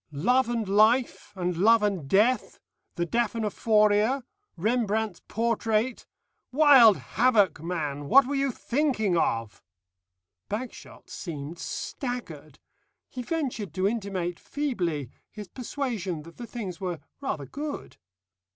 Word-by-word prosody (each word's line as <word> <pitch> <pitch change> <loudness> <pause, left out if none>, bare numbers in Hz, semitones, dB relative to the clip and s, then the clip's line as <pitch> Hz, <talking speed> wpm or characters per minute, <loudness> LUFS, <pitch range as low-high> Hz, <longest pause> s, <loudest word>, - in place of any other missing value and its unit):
Love 240 - +2
and 230 -3 -1
Life, 215 +3 +3
and 180 -1 -2
Love 220 +4 +5
and 190 -9 -1
Death, 225 +6 +2 0.4
the 175 - -1
Daphnephoria, 220 +2 +2 0.3
Rembrandt's 220 -1 0
portrait 230 +1 0 0.4
Wild 265 -7 +7
Havoc, 215 -8 +2
man! 150 -4 -3
What 270 - +7
were 280 - -3
you 275 0 +1
thinking 240 -7 0
of?" 115 -9 -1 0.9
Bagshot 235 +4 -7
seemed 160 -1 -6
staggered. 165 - -5 0.5
He 255 - -6
ventured 245 - -3
to 190 +1 +2
intimate 195 -6 -3
feebly 175 - -3 0.2
his 210 -2 -9
persuasion 225 - -4
that 165 +1 -14
the 240 - -7
things 205 -6 -6
were 180 -4 -3 0.2
rather 155 - -3
good. 290 - -6
215 Hz, 115 wpm, -27 LUFS, 175-245 Hz, 0.9 s, Wild